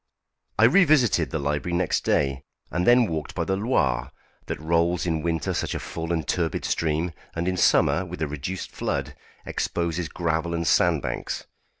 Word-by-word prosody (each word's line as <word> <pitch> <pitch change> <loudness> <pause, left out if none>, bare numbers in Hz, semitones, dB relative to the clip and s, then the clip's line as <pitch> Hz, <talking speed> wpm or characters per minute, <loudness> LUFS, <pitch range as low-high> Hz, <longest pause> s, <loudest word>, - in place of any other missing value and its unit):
I 110 - +4
revisited 130 - +4
the 80 - -2
library 75 +4 -1
next 90 -2 0
day, 70 -1 +1 0.3
and 90 +1 -1
then 120 0 +6
walked 80 -6 -4
by - - 0
the 95 - 0
Loire, 70 - 0 0.4
that - - -4
rolls 85 +2 +1
in 80 -2 0
winter 80 -3 -1
such - - -2
a - - -2
full 80 0 -5
and 80 -4 -1
turbid 80 -3 -1
stream, 80 +2 0 0.2
and 85 +1 -2
in 95 - +1
summer, 90 +1 +3
with 90 -1 -8
a - - 0
reduced 75 +6 -5
flood, - - -3 0.3
exposes 85 -1 -2
gravel 85 +1 -1
and 85 0 -2
sand 70 - +3
banks. - - -4
85 Hz, 175 wpm, -25 LUFS, 80-90 Hz, 0.4 s, then